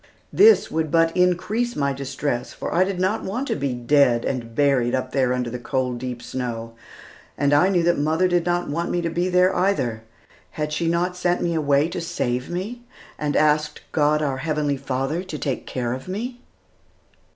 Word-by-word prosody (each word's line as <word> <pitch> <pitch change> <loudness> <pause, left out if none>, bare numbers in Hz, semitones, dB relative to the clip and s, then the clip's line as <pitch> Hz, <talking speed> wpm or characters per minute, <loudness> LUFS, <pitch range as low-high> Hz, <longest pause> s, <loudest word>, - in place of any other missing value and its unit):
This 440 +2 +6
would 160 -1 -1
but 165 +1 +2
increase 185 +7 +1
my 140 -1 0
distress, 135 -2 -3
for - - -5
I 175 - +4
did 190 -1 -3
not 190 +4 0
want 245 +8 -3
to - - +1
be 140 -3 -2
dead 120 -1 +3
and 115 -3 -3
buried 135 -4 +2
up 130 - -3
there 130 -2 +1
under 125 -2 -1
the 125 - -5
cold, 125 -1 -2
deep 125 -1 -5
snow, 115 -3 -5 0.6
and 140 +1 +2
I 150 +6 +5
knew 180 -3 +2
that 175 -3 +2
mother 160 +5 +2
did 175 -1 +1
not 175 0 0
want 170 +4 -2
me 175 - 0
to 165 - -1
be 175 +2 0
there 180 +1 +3
either. 130 - 0 0.6
Had 150 0 -2
she 170 - -1
not 175 +2 0
sent 180 0 0
me 170 - 0
away 145 -1 +2
to 175 - -4
save 125 -6 -2
me, 200 +8 -4 0.4
and 150 -1 -1
asked 150 0 +2
God, 150 0 +2
our 135 -3 -1
Heavenly 150 0 -1
Father, 135 +4 -2
to 185 -5 -6
take 135 -3 -3
care 120 -2 -2
of 130 +5 -7
me? 240 +6 -4
150 Hz, 195 wpm, -23 LUFS, 130-175 Hz, 0.6 s, This